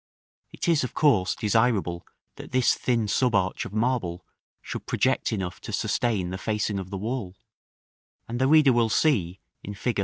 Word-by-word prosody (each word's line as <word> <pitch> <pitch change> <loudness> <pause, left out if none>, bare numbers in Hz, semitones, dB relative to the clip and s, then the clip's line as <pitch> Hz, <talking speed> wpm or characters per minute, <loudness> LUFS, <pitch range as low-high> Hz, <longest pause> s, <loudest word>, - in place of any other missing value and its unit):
It - - -5
is 165 -5 +3
of 125 - -5
course 110 -12 +3
desirable 105 -6 0 0.3
that - - -10
this 130 -1 +3
thin 115 -4 0
sub 125 +2 +1
arch 95 -1 0
of - - -7
marble 110 -6 -1 0.3
should - - -7
project - - +1
enough 95 -4 -4
to - - -7
sustain 100 -7 -1
the 95 - -5
facing 105 -2 -1
of 95 -1 -7
the 100 - -5
wall; 105 -2 -4 0.9
and 120 +2 -4
the 130 - +4
reader 150 -3 +6
will 115 -1 +2
see, 100 - +1 0.2
in 100 - -7
Fig. 115 +2 -2
110 Hz, 175 wpm, -26 LUFS, 95-125 Hz, 0.9 s, reader